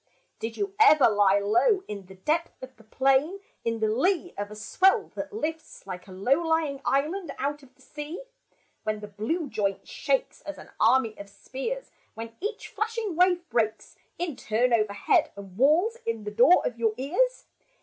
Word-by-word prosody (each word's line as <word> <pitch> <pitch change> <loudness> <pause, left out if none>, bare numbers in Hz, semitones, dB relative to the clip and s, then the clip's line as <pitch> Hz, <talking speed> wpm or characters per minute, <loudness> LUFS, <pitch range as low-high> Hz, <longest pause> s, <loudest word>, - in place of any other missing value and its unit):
Did 225 0 -5
you 400 -1 -2
ever 310 -10 +7
lie 205 -2 +4
low 235 - +2
In 200 -3 -7
the 190 - -13
depth 310 - -2
of 260 0 -9
the 225 - -19
plain, 270 - +2
& - - -42
In 230 -1 -2
the 220 - +3
lee 350 - +1
of 205 0 -4
a 210 - -9
swell 380 - +2
that - - -5
lifts 320 -6 -5
Like 185 -1 -7
a - - -12
low 245 - +1
lying 320 -4 0
island 320 +7 0
out 290 +2 -2
of 265 -2 -20
the - - -22
sea, 300 +9 -7 0.6
When 215 -1 -3
the 210 - -7
blue 225 - -2
joint 200 -6 -2
shakes - - -1
As - - -7
an - - -13
army 250 -5 +3
of 200 0 -9
spears; 460 - -6 0.2
When 225 0 -7
each 415 +4 -4
flashing 440 -3 -3
wave 355 0 +3
breaks 220 -2 -1 0.2
In 345 -5 -3
turn 240 +2 +1
overhead 215 -3 +2
And 195 -2 -11
wails 320 - +3
in 230 -2 -3
the 210 - -5
door 245 +12 +5
of 235 -1 -3
your 225 -2 +1
ears 375 - 0
265 Hz, 185 wpm, -27 LUFS, 215-350 Hz, 0.6 s, ever